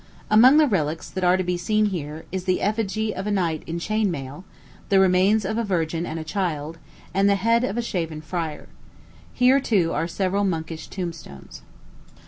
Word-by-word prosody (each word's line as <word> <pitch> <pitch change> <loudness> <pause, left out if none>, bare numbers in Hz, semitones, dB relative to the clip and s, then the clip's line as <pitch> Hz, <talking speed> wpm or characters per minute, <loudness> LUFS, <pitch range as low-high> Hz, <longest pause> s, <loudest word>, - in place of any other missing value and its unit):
Among 250 +7 +7
the 310 - +6
relics 160 - -1
that 185 - -4
are 180 +1 +4
to 185 - -1
be 180 0 -1
seen 215 +5 +1
here 160 -5 -4
is 185 0 -4
the 185 -1 +1
effigy 215 0 -1
of 195 +2 -5
a - - 0
knight 170 -6 0
in 165 - -3
chain 215 +4 0
mail, 145 0 -6 0.5
the 195 - +5
remains 190 +3 +3
of 220 +4 -1
a - - 0
virgin 170 -4 -1
and 160 0 -5
child, 160 -3 -3 0.3
and 195 +2 +3
the 200 - +4
head 230 +4 +2
of 210 -2 -2
a 240 - 0
shaven 165 -8 -3
friar. 160 -1 -5 0.6
Here, 255 +2 +4
too, 200 -11 +1
are 165 - -1
several 195 +3 -1
monkish 165 -4 -3
tombstones. 165 - -8
185 Hz, 185 wpm, -23 LUFS, 165-210 Hz, 0.6 s, Among